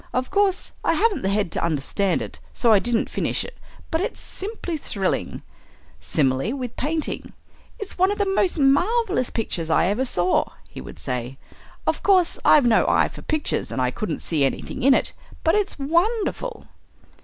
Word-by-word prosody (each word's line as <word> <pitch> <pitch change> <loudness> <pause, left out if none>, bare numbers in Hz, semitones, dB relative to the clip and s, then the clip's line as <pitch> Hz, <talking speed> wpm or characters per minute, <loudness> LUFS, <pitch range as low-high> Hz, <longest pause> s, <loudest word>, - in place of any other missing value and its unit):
Of 255 0 -1
course 400 -1 +1
I - - +3
haven't 450 -4 +2
the 190 - 0
head 200 -3 +1
to - - -2
understand 170 +4 0
it, - - -8
so 230 -2 +3
I 205 - +6
didn't 235 +1 0
finish - - -1
it, 485 - -11 0.3
but 320 - +1
it's 440 - -3
simply 390 -4 -4
thrilling." 200 -10 -2 0.6
Similarly 135 - +1
with 255 -4 -5
painting, 310 +3 -3 0.4
"It's 405 -3 -8
one 375 +1 +5
of 410 - -2
the 405 - +1
most 385 -2 +1
marvellous 355 - +2
pictures 175 -7 -2
I 160 - +3
ever 205 +8 +1
saw," 180 -7 +2 0.2
he - - -9
would - - -10
say. 125 +1 -4 0.5
"Of - - 0
course 370 -4 +3
I've 290 -4 +6
no 230 -2 +4
eye - - +3
for - - -11
pictures, 310 -1 -1
and - - -3
I 125 -1 +1
couldn't 215 - -4
see 155 -4 +1
anything 135 - -2
in 270 +2 +6
it, - - 0 0.3
but 325 - +3
it's 415 -1 0
wonderful!" 410 - -1
270 Hz, 180 wpm, -23 LUFS, -, 0.6 s, I